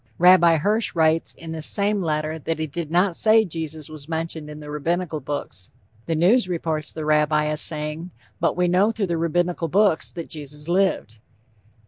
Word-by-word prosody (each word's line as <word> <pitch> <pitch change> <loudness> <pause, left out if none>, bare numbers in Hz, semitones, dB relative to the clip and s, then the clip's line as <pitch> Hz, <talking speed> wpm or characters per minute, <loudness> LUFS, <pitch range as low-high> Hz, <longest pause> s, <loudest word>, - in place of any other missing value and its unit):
Rabbi 175 -2 +6
Hirsch 210 +7 +1
writes 160 0 +1
in 165 -1 -9
this 160 -1 -1
same 205 0 +1
letter 155 -1 -2
that 165 +2 -3
he 155 - -2
did 155 +1 -6
not 175 +2 +2
say 220 +2 +4
Jesus 160 -3 -6
was 155 -1 -12
mentioned 160 -2 -4
in 150 0 -9
the 150 -1 -9
Rabbinical 165 +2 -2
Books. 130 -10 -6 0.4
The 165 - 0
News 185 +6 +3
reports 160 -3 -2
the 155 -1 -6
Rabbi 150 0 +2
as 150 0 +2
saying, 155 +2 0 0.3
"But - - 0
we 180 0 +2
know 185 +4 +3
through 220 -3 -2
the 170 -2 -2
Rabbinical 170 +1 0
Books 195 0 +2
that 170 -2 -8
Jesus 150 0 -8
lived." 175 - 0
160 Hz, 180 wpm, -22 LUFS, 150-180 Hz, 0.4 s, Rabbi